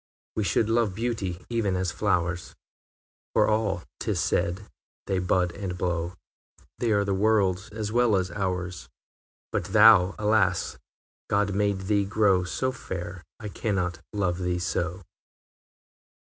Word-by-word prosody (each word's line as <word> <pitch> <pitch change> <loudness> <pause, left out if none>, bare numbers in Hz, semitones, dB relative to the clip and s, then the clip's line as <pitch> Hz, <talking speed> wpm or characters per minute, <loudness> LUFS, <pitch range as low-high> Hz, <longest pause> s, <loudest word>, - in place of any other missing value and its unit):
IV. - - -20
We 110 - +1
should 95 +5 +2
love 115 -4 +1
beauty 100 -6 -3
even 115 -5 0
as 90 -1 -1
flowers 90 -2 -1 0.8
For - - +4
all, 105 -5 0 0.2
'tis - - -1
said, 95 +4 0 0.4
they 95 - 0
bud 90 -1 +1
and 90 -1 -5
blow, 90 0 -2 0.6
They 120 -2 +1
are 100 -1 +3
the 100 - 0
world's 95 -2 +2
as 105 -1 -4
well 120 -2 +3
as 95 -1 0
ours 90 -2 -3 0.6
But - - -1
thou 105 -2 +6
alas! 105 -4 +1 0.5
God 100 -1 +1
made 100 -1 +1
thee 100 +1 +1
grow 100 -2 +3
So 130 +8 -1
fair, 90 -7 -6 0.2
I 105 - -6
cannot 95 -4 -2
love 95 -4 -1
thee 90 -1 -1
so! 90 +2 -2
95 Hz, 140 wpm, -26 LUFS, 90-105 Hz, 0.8 s, thou